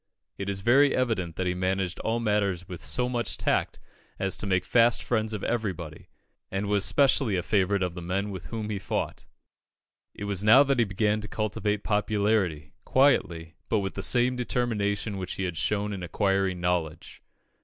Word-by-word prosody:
It 100 0 -4
is 95 -1 -2
very 135 +6 +4
evident 110 -10 -1
that 95 - -2
he 90 - 0
managed 95 0 -2
all 115 +1 -1
matters 100 -5 0
with 90 -2 -8
so 125 0 +1
much 120 -2 -2
tact - - 0 0.4
as 95 -1 0
to 105 - -5
make 95 -2 +1
fast 115 +2 +3
friends 110 -2 0
of 105 -2 -4
everybody, 95 -9 -4 0.4
and 95 +1 -2
was 100 -1 +1
specially 135 -4 +3
a 90 - -1
favourite 100 0 +1
of 90 -2 -2
the 90 - -7
men 95 +4 -2
with 95 -2 -7
whom 110 -2 -4
he 100 - -2
fought. - - -4 0.9
It - - -7
was 100 -1 -1
now 115 +6 +7
that 140 -2 0
he 120 - +4
began 105 +2 0
to 105 - -7
cultivate 105 -1 -2
popularity, 105 -7 0
quietly, 85 -12 +2 0.2
but 110 - +2
with 95 -4 -2
the - - -5
same 125 +1 +2
determination 110 -5 -1
which 90 -1 -4
he 95 - -4
had 90 -2 -3
shown 105 +5 -1
in 95 - -6
acquiring 95 +1 0
knowledge. 85 -3 -2
100 Hz, 185 wpm, -27 LUFS, 90-110 Hz, 0.9 s, now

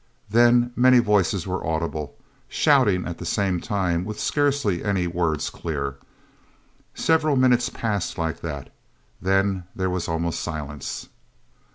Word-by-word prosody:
Then 120 +1 +4
many 125 +1 +6
voices 105 -5 +2
were 95 0 -3
audible, 80 -1 -3 0.3
shouting 125 -11 +3
at 85 - -6
the - - -6
same 95 0 0
time, 90 -4 -1
with 105 +2 -6
scarcely 140 - +1
any 100 -4 0
words 85 -3 -1
clear... 70 -4 -4 1.0
Several 155 -2 +2
minutes 125 -2 +3
passed 105 -5 -2
like 80 -1 -2
that. 70 -5 -6 0.5
Then 95 -1 +1
there 95 -1 -1
was 90 -1 -2
almost 80 0 -1
silence. 75 -4 -5
95 Hz, 130 wpm, -24 LUFS, 85-120 Hz, 1.0 s, many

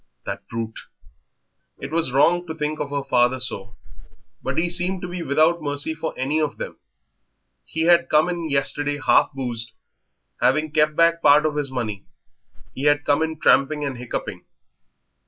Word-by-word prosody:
That - - -6
brute! 115 -1 -5 1.0
It - - -7
was 160 -5 0
wrong 175 +6 +3
to 160 - -5
think 155 -1 -3
of 140 - -3
her 140 -1 -2
father 125 0 +2
so, 105 -5 -2 0.7
but - - -4
he 170 - +2
seemed 180 +2 0
to - - -3
be 175 0 -5
without 160 +3 +2
mercy 145 +1 -2
for 160 - -5
any 145 +5 0
of 150 -2 -2
them. - - -7 0.9
He 160 - -2
had 170 0 +4
come 155 +2 +4
in 170 -2 -3
yesterday 145 +1 0
half - - +3
boozed, 120 -4 -4 0.7
having 155 +4 +2
kept 150 0 +2
back 170 0 +3
part 150 +2 +5
of 150 -1 0
his 145 -2 -1
money 110 -6 -4 0.7
he 135 - -5
had 145 0 +3
come 145 +1 +2
in 160 -1 -2
tramping 150 +1 +3
and 135 -2 -3
hiccuping. 125 -1 -5
150 Hz, 170 wpm, -22 LUFS, 135-160 Hz, 1.0 s, part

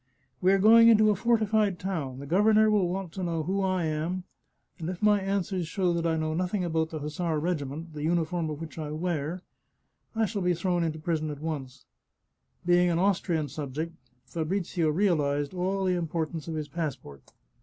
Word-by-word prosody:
" 130 -1 -42
We 185 +1 +4
are 195 - +5
going 225 +3 +7
into 215 -2 +6
a - - +1
fortified 215 -3 +2
town; 160 -10 -3
the 140 - -7
governor 215 +6 +4
will 200 -4 +2
want 185 -1 -4
to 190 +2 -5
know 165 -2 -1
who 195 +5 -1
I 185 -3 0
am, 160 +4 -2 0.6
and 165 0 -4
if 180 -1 -5
my 210 -1 +4
answers 190 -2 -1
show 180 0 0
that 170 0 0
I 160 -1 +1
know 155 0 -1
nothing 180 +3 -1
about 160 -2 0
the 160 - -5
hussar 155 +2 -2
regiment, 155 -1 -3
the 150 - -6
uniform 165 +1 0
of 150 -1 -5
which 165 -1 -8
I 155 -1 -4
wear, 170 +1 -2 0.7
I 225 0 +2
shall 205 -1 -3
be 180 -1 +2
thrown 175 0 0
into 160 -1 -2
prison 155 -1 -2
at 145 - -5
once." 140 -4 -5 0.8
Being 175 0 +4
an 170 - +1
Austrian 175 -4 +1
sub 140 -1 -6
ject, 165 +2 -3 0.3
Fabrizio 170 0 -1
realized 150 -5 +1
all 190 +2 -1
the 185 - +2
importance 165 -2 -3
of 165 - -3
his 155 -1 -3
passport. 140 - -6
170 Hz, 195 wpm, -28 LUFS, 155-190 Hz, 0.8 s, going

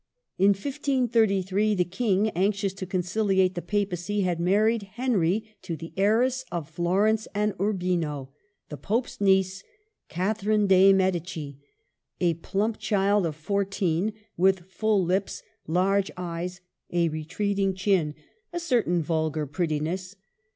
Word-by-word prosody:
In 200 +2 +6
1533 215 -6 +1
the 180 - +2
King, 200 +2 +1
anxious 195 +1 0
to 195 -1 -7
conciliate 190 0 +1
the 175 - -4
Papacy, 205 0 -1
had 180 -3 0
married 210 +6 +2
Henry 215 -3 0
to 165 - -5
the 165 +2 -9
heiress 240 +6 +2
of 170 -4 -3
Florence 190 +7 +1
and 210 0 +1
Urbino, 175 -9 -1 0.4
the 150 - -6
Pope's 215 - -2
niece, 190 -1 +2 0.5
Cathe 195 +5 -2
rine 210 0 +3
dei 190 0 +6
Medici, 175 -7 -1 0.6
a 175 -2 +2
plump 200 +7 -2
child 200 -2 +2
of 155 - -5
fourteen, 195 +2 -1 0.2
with 190 +1 +3
full 200 +2 +1
lips, 190 +3 -1 0.2
large 190 +4 +2
eyes, 175 +1 -5 0.3
a 170 -1 +2
retreating 190 +5 -1
chin, 185 -6 +1 0.2
— 455 +1 -44
a 345 - -3
certain 235 - +1
vulgar 155 -1 -1
prettiness. 165 +5 -2
190 Hz, 130 wpm, -26 LUFS, 175-210 Hz, 0.6 s, In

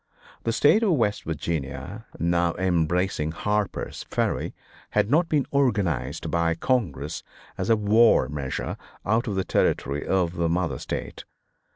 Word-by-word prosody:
The 115 - +2
State 145 - +4
of 210 -6 +3
West 105 -8 0
Virginia, 80 - -4
now 85 0 +1
embracing 90 -2 0
Harper's 105 +3 -2
Ferry, - - -1 0.3
had 110 - +1
not 165 +3 +3
been 145 -3 +2
organized 105 - 0
by 85 -1 +1
Congress 80 - -1 0.3
as - - -3
a 115 - +6
war 105 - +5
measure 70 -1 -4 0.3
out 115 +5 +1
of 105 - -1
the 95 - 0
territory 70 +3 +1
of 90 -2 0
the 85 -1 +1
mother 85 0 0
State. - - -5
90 Hz, 140 wpm, -25 LUFS, 80-115 Hz, 0.3 s, a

